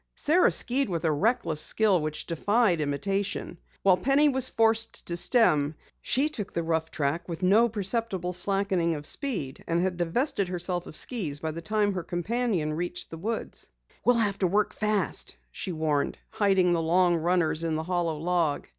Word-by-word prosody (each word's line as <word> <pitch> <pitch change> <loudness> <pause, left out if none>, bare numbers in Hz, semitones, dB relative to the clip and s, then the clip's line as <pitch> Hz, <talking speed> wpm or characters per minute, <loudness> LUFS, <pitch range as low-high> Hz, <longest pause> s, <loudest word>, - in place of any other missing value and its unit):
Sara 340 +5 +4
skied 265 0 +2
with 170 -2 -3
a 160 - +3
reckless 155 -2 0
skill 205 -6 +3
which 155 0 -4
defied 190 +1 +1
imitation. 190 +5 -2 0.2
While 190 -2 +5
Penny 275 +9 +3
was 260 -2 +4
forced 225 0 +1
to 170 - -2
stem, 155 - +3 0.3
she 270 +4 +1
took 225 -10 -6
the 170 - -2
rough 160 0 -1
track 160 +3 -2
with 170 +2 -6
no 215 +6 +4
perceptible 200 -3 -2
slackening 185 -2 0
of 145 0 -7
speed, 190 - -4
and 170 +1 0
had 180 0 -1
divested 195 - 0
herself 180 0 -3
of - - -7
skis 170 - +2
by 160 +1 -3
the 165 +2 -7
time 210 +1 0
her 185 - -3
companion 175 -1 -2
reached 175 +2 -4
the 165 - -8
woods. 220 +5 -5 0.4
"We'll 245 - +4
have 205 -4 0
to 185 - +2
work 205 +4 0
fast," 210 - -1 0.2
she 185 - -5
warned, 155 -3 -1
hiding 190 -4 +2
the 170 - +1
long 175 +2 +3
runners 165 -1 +1
in 165 -1 -1
the 160 - -2
hollow 170 -2 -1
log. 165 -2 -1
180 Hz, 175 wpm, -27 LUFS, 165-215 Hz, 0.4 s, While